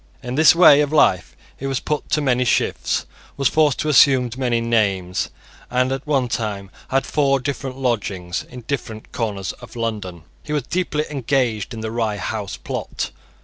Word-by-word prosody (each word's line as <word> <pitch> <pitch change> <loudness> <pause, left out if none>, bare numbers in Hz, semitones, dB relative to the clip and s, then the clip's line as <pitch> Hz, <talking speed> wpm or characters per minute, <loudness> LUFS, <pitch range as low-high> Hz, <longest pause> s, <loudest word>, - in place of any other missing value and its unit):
In 125 +1 -4
this 155 +3 +6
way 155 -4 +8
of 145 -1 0
life 95 - +3 0.2
he 135 - -5
was 135 -2 -1
put 150 -1 -3
to 150 - +1
many 125 -3 +2
shifts, 120 - 0 0.3
was 140 -1 +3
forced 150 -4 +3
to 155 - -2
assume 130 -2 +5
many 125 -3 0
names, 100 -6 0 0.4
and 125 +1 +1
at 135 +2 -4
one 135 -4 +2
time 105 -5 -3 0.2
had 135 0 +1
four 135 -2 +2
different 135 -1 -4
lodgings 100 -8 -2
in 125 0 -9
different 115 -4 -5
corners 100 -6 -3
of - - -12
London. 105 -8 -4 0.2
He 150 - -6
was 145 -3 0
deeply 155 0 -1
engaged 125 -6 0
in 115 -2 -6
the 110 0 -4
Rye 110 -3 -1
House 100 -1 -4
plot. - - -4
125 Hz, 175 wpm, -21 LUFS, 110-140 Hz, 0.4 s, way